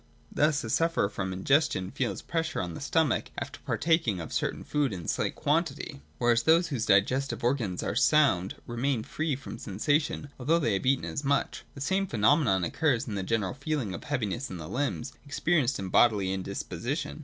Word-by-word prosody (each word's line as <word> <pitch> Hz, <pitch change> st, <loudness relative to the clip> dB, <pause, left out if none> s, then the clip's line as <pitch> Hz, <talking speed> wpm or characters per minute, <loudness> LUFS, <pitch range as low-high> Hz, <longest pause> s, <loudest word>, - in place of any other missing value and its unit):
Thus 150 Hz, -1 st, +2 dB
a 110 Hz, -, -5 dB
sufferer 165 Hz, -11 st, +2 dB
from 95 Hz, -2 st, -3 dB
indigestion 100 Hz, 0 st, +1 dB
feels 115 Hz, -7 st, -2 dB
pressure 160 Hz, -2 st, -2 dB
on 90 Hz, -2 st, -3 dB
the -, -, -7 dB
stomach, 145 Hz, -1 st, +1 dB
after -, -, -5 dB
partaking 160 Hz, -, +1 dB
of 80 Hz, -, -6 dB
certain -, -, -1 dB
food 145 Hz, -6 st, 0 dB
in 85 Hz, -4 st, -6 dB
slight -, -, -1 dB
quantity; 150 Hz, -2 st, -1 dB, 0.2 s
whereas 120 Hz, -1 st, +3 dB
those 165 Hz, +5 st, +4 dB
whose 125 Hz, -7 st, -2 dB
digestive 120 Hz, +9 st, +2 dB
organs 120 Hz, -8 st, 0 dB
are -, -, -1 dB
sound 130 Hz, -, +3 dB
remain 120 Hz, 0 st, -1 dB
free 155 Hz, +2 st, -2 dB
from 130 Hz, -3 st, -8 dB
the -, -, -16 dB
sensation, 145 Hz, +8 st, -1 dB
although 150 Hz, +6 st, +2 dB
they 130 Hz, -10 st, +1 dB
have 95 Hz, +6 st, -1 dB
eaten 135 Hz, 0 st, +2 dB
as 145 Hz, -, -4 dB
much. 140 Hz, 0 st, 0 dB
The 140 Hz, -, -9 dB
same 195 Hz, +6 st, +1 dB
phenomenon 115 Hz, -, +3 dB
occurs 130 Hz, -, +1 dB
in 110 Hz, -, -4 dB
the 100 Hz, -, -2 dB
general 100 Hz, 0 st, -1 dB
feeling 135 Hz, -6 st, -2 dB
of -, -, -7 dB
heaviness 125 Hz, -2 st, -2 dB
in 95 Hz, -, -6 dB
the 80 Hz, -2 st, -7 dB
limbs, 140 Hz, -, -2 dB
experienced 145 Hz, -2 st, +1 dB
in 95 Hz, -1 st, -4 dB
bodily 100 Hz, -3 st, +4 dB
indisposition. 100 Hz, -, -4 dB
130 Hz, 185 wpm, -28 LUFS, 100-150 Hz, 0.2 s, those